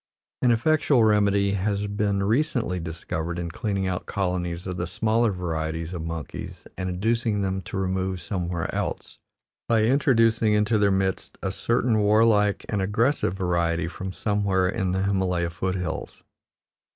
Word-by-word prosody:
An 125 - +4
effectual 135 +1 +3
remedy 100 -2 +3
has 100 +1 -1
been 100 -1 0
recently 115 - 0
discovered 85 0 -4
in 85 -1 -4
cleaning 100 +1 -2
out 90 -1 -3
colonies 90 -3 -2
of 90 -1 -4
the 85 - -2
smaller 110 +5 +1
varieties 80 -2 -3
of 85 - -4
monkeys 80 -2 -6
and 95 0 -3
inducing 110 +2 0
them 95 0 -1
to 95 - -6
remove 95 -1 -1
somewhere 85 -1 -3
else, - - -4 0.5
by 115 -2 +4
introducing 115 -4 +3
into 105 +1 +2
their 100 -1 +4
midst 95 -1 -1
a 95 - -1
certain 115 +2 +1
warlike 105 -1 +3
and 105 -2 -1
aggressive 105 +2 +1
variety 85 -3 0
from 95 +2 -6
somewhere 100 -2 +1
in 95 -1 -1
the 95 +1 0
Himalaya 90 -3 0
foot 95 +2 -2
hills. 90 -3 -5
95 Hz, 150 wpm, -25 LUFS, 90-110 Hz, 0.5 s, An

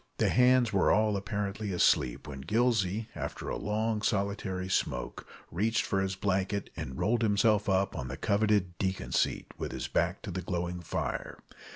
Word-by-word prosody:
The - - +2
hands 125 -2 +4
were 95 - +3
all 105 0 +3
apparently 100 +1 -3
asleep 65 -8 +2
when 65 -2 -7
Gillsey, 110 - +1
after - - -5
a - - -2
long 110 +1 -1
solitary 100 -3 -1
smoke, 95 - -2 0.2
reached 110 +7 +1
for 95 - 0
his 95 0 -1
blanket, 100 +1 -1
and 65 0 -6
rolled 115 +2 +1
himself 105 -1 +3
up 95 0 +1
on 65 - -4
the 65 +2 -5
coveted 100 -4 +1
"deacon 95 -1 -2
seat," - - +1
with - - -3
his - - -4
back - - 0
to - - -5
the 95 - -3
glowing 90 -1 -3
fire. 85 - -3
100 Hz, 170 wpm, -30 LUFS, 95-110 Hz, 0.2 s, hands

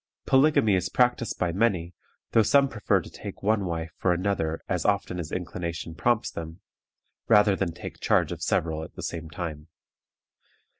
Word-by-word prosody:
Polygamy 135 -6 +4
is 90 -1 +1
practiced 120 +1 +1
by 90 -2 0
many, 90 -3 0 0.4
though 115 - +5
some 140 +6 +4
prefer 110 -6 +1
to - - -11
take - - -9
one 105 -1 +2
wife 80 -2 -3
for 90 - +2
another 85 -3 -1
as 90 -4 -1
often 100 -3 0
as 80 -3 -5
inclination 85 -2 -4
prompts 120 +6 +1
them, 80 +1 -7 0.7
rather 105 -2 +5
than 95 -3 -1
take 85 - -9
charge - - +2
of - - -6
several 80 -1 0
at - - -11
the - - -7
same 80 -1 -5
time. 80 -2 -6
90 Hz, 165 wpm, -26 LUFS, 85-105 Hz, 0.7 s, though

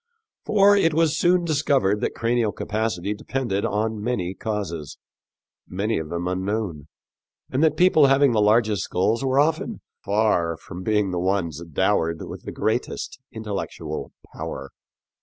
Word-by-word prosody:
For 205 -1 +5
it 165 -6 +3
was 160 -1 +3
soon 175 +1 +3
discovered 140 -10 +2
that - - -1
cranial 115 -2 +1
capacity 105 -3 -2
depended 110 -2 -2
on 110 +1 -1
many 100 -7 -1
causes 95 -9 -4 0.7
many 100 +3 -1
of 80 -1 -6
them 85 +1 -3
unknown 95 -4 -2 0.6
and 135 +4 +1
that 160 - +3
people 165 -5 +6
having 135 0 +4
the 110 -2 +2
largest 105 -1 +3
skulls 110 +7 0
were 135 0 +2
often 155 +2 0 0.2
far 100 -6 +1
from 90 +3 -9
being 105 -1 +1
the 90 - -1
ones 90 -4 -1
dowered 85 -1 +1
with - - -9
the - - -5
greatest - - -2
intellectual 100 -8 -5 0.2
power. 70 0 -6
105 Hz, 140 wpm, -24 LUFS, 90-135 Hz, 0.7 s, people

